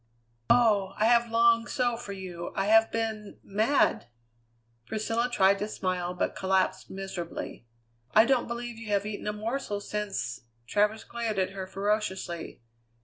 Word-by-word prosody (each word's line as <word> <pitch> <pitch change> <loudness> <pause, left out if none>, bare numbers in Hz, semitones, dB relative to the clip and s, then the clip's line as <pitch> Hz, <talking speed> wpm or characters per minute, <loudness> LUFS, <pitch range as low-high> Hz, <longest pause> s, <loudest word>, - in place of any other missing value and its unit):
"Oh! 205 -5 +4
I 215 - +2
have 235 0 +4
longed 230 0 +4
so 245 -3 +1
for 230 -3 -7
you! 180 -3 -6
I 195 - 0
have 225 +2 +5
been 220 -2 -3
mad!" 220 - +2 0.8
Priscilla 225 - -1
tried 195 -2 +4
to 210 - -2
smile, 180 -3 -2
but - - -1
collapsed 190 0 0
miserably. 185 -9 -6 0.5
"I 220 - +8
don't 260 -1 +2
believe 235 -1 -5
you 230 - -9
have 205 -1 +1
eaten 210 0 -5
a 210 - 0
morsel 215 0 -3
since 205 - -3
" 115 +1 -41
Travers 210 - +1
glared 230 -3 -3
at 190 0 +1
her 190 -1 -6
ferociously. 190 - -2
210 Hz, 150 wpm, -28 LUFS, 190-230 Hz, 0.8 s, I